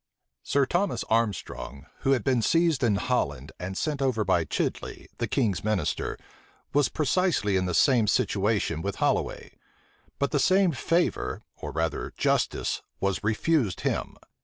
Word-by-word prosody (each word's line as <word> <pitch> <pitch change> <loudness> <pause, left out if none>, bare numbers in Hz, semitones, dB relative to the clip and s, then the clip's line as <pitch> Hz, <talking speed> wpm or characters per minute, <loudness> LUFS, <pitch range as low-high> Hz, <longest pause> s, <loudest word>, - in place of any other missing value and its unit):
Sir 140 -1 +2
Thomas 175 -4 0
Armstrong, 105 -10 -1
who 135 -1 +2
had 130 - 0
been 130 -4 +2
seized 165 +1 +2
in 110 -4 +3
Holland, 75 - -1
and 95 +2 -5
sent 150 -3 -2
over 120 -6 +1
by 85 -3 +2
Chidley, - - -3
the - - 0
king's 100 -6 0
minister, 105 -7 -1 0.6
was 145 -2 +3
precisely 155 - +1
in 90 -1 +1
the 90 - -1
same 120 +3 +4
situation 100 -6 +1
with 100 +2 -3
Holloway: - - -1 0.6
but 140 - 0
the 145 - +1
same 185 +4 +4
favor, 165 +5 0
or - - -7
rather 80 +1 -2
justice, - - 0 0.2
was 100 0 -1
refused 110 - +1
him. - - -2
115 Hz, 145 wpm, -27 LUFS, 95-145 Hz, 0.6 s, same